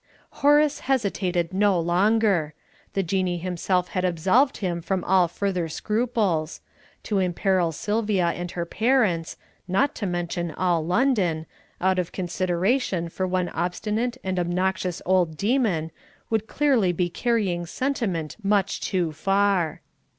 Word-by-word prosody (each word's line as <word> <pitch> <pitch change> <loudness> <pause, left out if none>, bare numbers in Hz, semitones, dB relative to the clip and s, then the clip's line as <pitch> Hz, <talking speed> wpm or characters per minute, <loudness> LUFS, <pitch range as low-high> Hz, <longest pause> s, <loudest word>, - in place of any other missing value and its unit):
Horace 295 +1 +4
hesitated 190 -8 0
no 195 -2 +3
longer. 180 -2 +2 0.4
The 195 - 0
Jinnee 185 0 0
himself 180 +1 -1
had 185 - -2
absolved 185 - +2
him 175 -4 -2
from 185 +1 -2
all 185 -1 +4
further 180 -1 -2
scruples; 210 -5 -1 0.4
to 205 -3 0
imperil 180 -1 +1
Sylvia 205 0 0
and 175 +1 -4
her 170 0 -3
parents 215 -6 +1 0.3
not 195 +10 +1
to 205 - -2
mention 175 0 -2
all 175 -3 +1
London 180 - +1 0.3
out 185 0 +2
of 180 -1 -2
consideration 185 +1 0
for 185 +3 -2
one 180 -1 0
obstinate 215 +8 -2
and 185 -1 -1
obnoxious 180 0 -1
old 180 -4 +2
demon, 200 - +1 0.4
would 220 -1 0
clearly 260 -11 +2
be 175 0 0
carrying 185 -4 -1
sentiment 195 - -2
much 200 -1 +1
too 175 -4 0
far. 195 -1 +1
185 Hz, 130 wpm, -24 LUFS, 175-210 Hz, 0.4 s, Horace